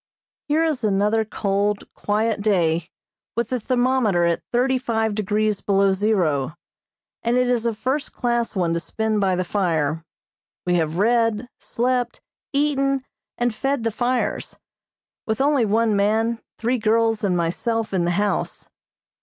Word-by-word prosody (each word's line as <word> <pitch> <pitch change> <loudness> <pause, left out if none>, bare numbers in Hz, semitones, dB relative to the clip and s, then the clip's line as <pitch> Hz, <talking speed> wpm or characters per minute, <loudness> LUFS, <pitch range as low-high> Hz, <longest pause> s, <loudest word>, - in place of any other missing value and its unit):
Here 305 +2 +2
is 305 -7 -1
another 210 +2 +2
cold, 205 -1 -1
quiet 215 +1 0
day, 170 -5 +1 0.5
with 235 -1 0
the 255 - -1
thermometer 245 -6 +2
at 170 -1 +1
thirty 255 +2 +2
five 225 -3 0
degrees 210 0 0
below 195 -1 +3
zero, 175 -8 +1 0.7
and 235 +1 +1
it 250 0 +3
is 240 -2 +1
a 230 - 0
first 265 +7 -2
class 235 -2 -1
one 175 -3 +1
to 170 - 0
spend 220 +4 -1
by 190 -2 +2
the 185 - 0
fire. 165 -5 0 0.6
We 180 - +1
have 160 0 -1
read, 230 +2 +2
slept, 245 +1 -1 0.3
eaten, 275 -2 +1 0.3
and 240 -1 0
fed 270 +1 -1
the 225 - 0
fires; 245 +3 -1 0.7
with 220 -1 -1
only 275 -3 +3
one 220 +1 +2
man, 220 +3 +1 0.2
three 240 +2 0
girls 225 0 +2
and 185 -3 +2
myself 215 +7 -1
in 185 -2 +1
the 170 - +1
house. 205 0 -2
220 Hz, 145 wpm, -22 LUFS, 195-245 Hz, 0.7 s, below